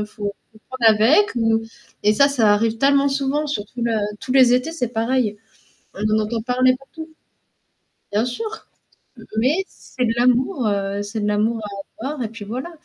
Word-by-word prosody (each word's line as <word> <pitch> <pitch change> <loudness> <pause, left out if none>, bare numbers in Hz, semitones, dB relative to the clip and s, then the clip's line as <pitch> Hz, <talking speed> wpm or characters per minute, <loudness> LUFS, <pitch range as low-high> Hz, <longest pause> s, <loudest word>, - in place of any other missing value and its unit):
il - - -5
faut 205 -1 -5 0.2
faut 215 - -18
le - - -41 0.3
prendre - - +9
avec 315 - +5
ou 225 -1 +2 0.4
et 210 +1 +4
ça, 280 +6 +5
ça 225 -7 +3
arrive 225 +1 0
tellement 280 +1 +4
souvent 275 +2 -1
sur 215 -8 -2
tous 245 +3 -7
le 235 0 0 0.3
tous 255 - -4
les 255 -2 +6
étés, 255 +5 0
c'est 255 -8 -2
pareil. 230 -1 0 0.6
On 205 - -5
en - - +2
entend 225 +1 -3
parler 255 +2 +2
partout. 320 +4 -11 1.0
Bien 210 +3 +1
sûr, 435 - -6 0.7
mais 295 +12 +2
c'est 255 - -6
de 225 - +1
l'amour, 250 - +2
heu, 200 0 -1
c'est 205 +2 -5
de 205 - -1
l'amour 220 +2 +1 0.4
à - - -3
avoir 295 -3 -4
et - - -3
puis 225 -1 -9
voilà. 255 +10 -5
240 Hz, 190 wpm, -21 LUFS, 220-275 Hz, 1.0 s, prendre